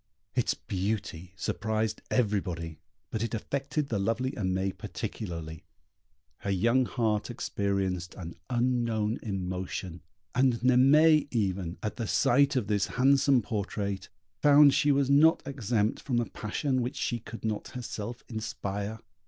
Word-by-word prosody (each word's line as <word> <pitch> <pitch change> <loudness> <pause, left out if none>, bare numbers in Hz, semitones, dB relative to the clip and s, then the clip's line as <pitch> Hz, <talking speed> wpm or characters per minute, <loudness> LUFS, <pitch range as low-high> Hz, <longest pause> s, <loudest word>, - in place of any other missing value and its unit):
Its - - +1
beauty 95 -3 -3
surprised 110 +3 -2
everybody, 90 -8 -1 0.3
but 110 - -2
it 115 0 -1
affected 140 +5 -2
the 105 - 0
lovely 115 +6 0
Aimée 95 -2 -1
particularly 85 -6 -6 0.8
her 100 - -4
young 115 +7 +3
heart 110 -3 0
experienced 95 -6 -2
an 85 -3 -7
unknown 120 -3 0
emotion; 95 -3 -4 0.3
and 130 -1 +3
Naimée 145 +5 +5
even, 95 -7 -1
at 105 - -3
the 115 -3 -3
sight 140 +7 +3
of 125 -5 +1
this 105 -2 +1
handsome 135 0 +3
portrait, 100 -3 -3 0.3
found 145 -1 +7
she 145 - +3
was 140 -1 +2
not 155 +3 +5
exempt 115 -6 -1
from 125 -4 0
a 120 - 0
passion 130 +6 -2
which 125 +3 -3
she 120 - -1
could 115 +1 -9
not 110 -1 -2
herself 120 -1 -6
inspire. 105 -1 -4
110 Hz, 130 wpm, -29 LUFS, 100-125 Hz, 0.8 s, found